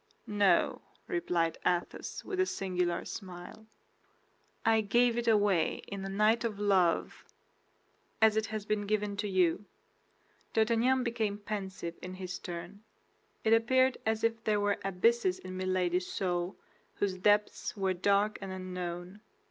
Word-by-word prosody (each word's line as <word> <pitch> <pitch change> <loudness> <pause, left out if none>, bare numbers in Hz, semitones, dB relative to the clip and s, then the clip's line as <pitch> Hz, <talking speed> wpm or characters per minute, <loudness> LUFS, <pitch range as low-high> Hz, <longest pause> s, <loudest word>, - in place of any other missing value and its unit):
"No," 205 -3 +2 0.2
replied 175 - 0
Athos, 175 -1 -2
with 380 -2 -4
a 375 - +4
singular 180 - -1
smile. 185 +2 -9 1.0
"I 225 0 +4
gave 235 +3 +3
it 240 0 -2
away 205 -7 +2
in 200 -1 -5
a 195 - -4
night 215 +4 +3
of 215 -3 -3
love, 190 -5 +2 1.0
as 220 -1 +5
it 220 0 +1
has 215 -1 -4
been 210 -1 -1
given 210 -1 0
to 205 +1 -1
you." 185 +1 +2 0.9
D'Artagnan 235 +4 +3
became 225 -4 -1
pensive 190 -5 -5
in 185 0 -7
his 185 -1 -6
turn; 175 +4 -7 0.6
it 220 - +4
appeared 255 +3 +3
as 220 0 0
if 230 0 0
there 210 -2 +2
were 205 0 +1
abysses 195 +1 +2
in 185 0 -8
Milady's 185 -1 0
soul 175 -1 -1 0.4
whose 190 -2 -1
depths 210 +2 +1
were 190 -1 +1
dark 200 +3 +2
and 195 -1 -5
unknown. 180 +1 -6
200 Hz, 140 wpm, -31 LUFS, 185-220 Hz, 1.0 s, as